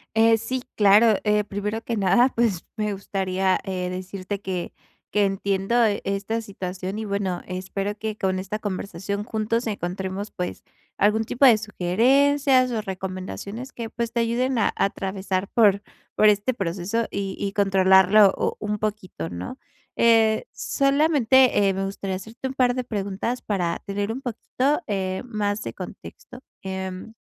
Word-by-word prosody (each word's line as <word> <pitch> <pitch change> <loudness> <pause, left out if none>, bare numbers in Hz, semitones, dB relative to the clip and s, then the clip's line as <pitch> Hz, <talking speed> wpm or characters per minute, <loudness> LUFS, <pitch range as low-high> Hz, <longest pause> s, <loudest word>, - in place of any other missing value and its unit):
Eh, 225 0 +5
sí, 255 +4 -3
claro. 210 +1 +6
Eh, 210 0 +2
primero 210 +2 -3
que 230 -1 -2
nada, 240 +6 +4
pues 225 -7 +1
me 210 -1 -1
gustaría, 190 -1 0
eh, 185 -2 -3
decirte 185 +2 -5
que 185 -3 -4 0.4
que 210 -1 +3
entiendo 195 +2 -1 0.3
esta 200 +3 -2
situación 190 -2 -5
y, 220 - -4
bueno, 200 -3 -2
espero 195 +2 -4
que 215 -1 -4
con 185 -1 0
esta 195 +3 -4
conversación 200 0 -4
juntos 225 +2 -1
encontremos, 190 +1 -4
pues, 180 0 -5 0.3
algún 210 +2 +3
tipo 250 +5 +2
de 240 - +8
sugerencias 255 - +3
o 220 -2 -1
recomendaciones 195 +5 -6
que, 230 -2 -6
pues, 235 -1 -3
te 235 - 0
ayuden 245 +2 0
a 210 - +3
a - - 0
atravesar 190 0 -3
por 205 -3 +4 0.3
por 215 - +6
este 210 +5 +1
proceso 195 +4 -2
y 195 -1 -3
y 200 - -2
controlarlo 190 0 +5
u - - 0
un 210 0 -2
poquito, 200 - -4
¿no? 90 +1 -7 0.4
Eh, 225 - +4
solamente, 275 -6 +3
eh, - - +1
me 195 0 -1
gustaría 195 -1 -4
hacerte 220 +7 -6
un 265 - -5
par 250 -1 +3
de 255 - -1
preguntas 210 +2 -3
para 180 -5 -1
tener 200 +1 -2
un 250 +4 -5
poquito, 265 +5 -1
eh, 190 -2 -2
más 210 -3 -2
de - - -5
contexto. 250 - -10 0.2
Em, 190 +2 -5
205 Hz, 155 wpm, -24 LUFS, 190-230 Hz, 0.4 s, de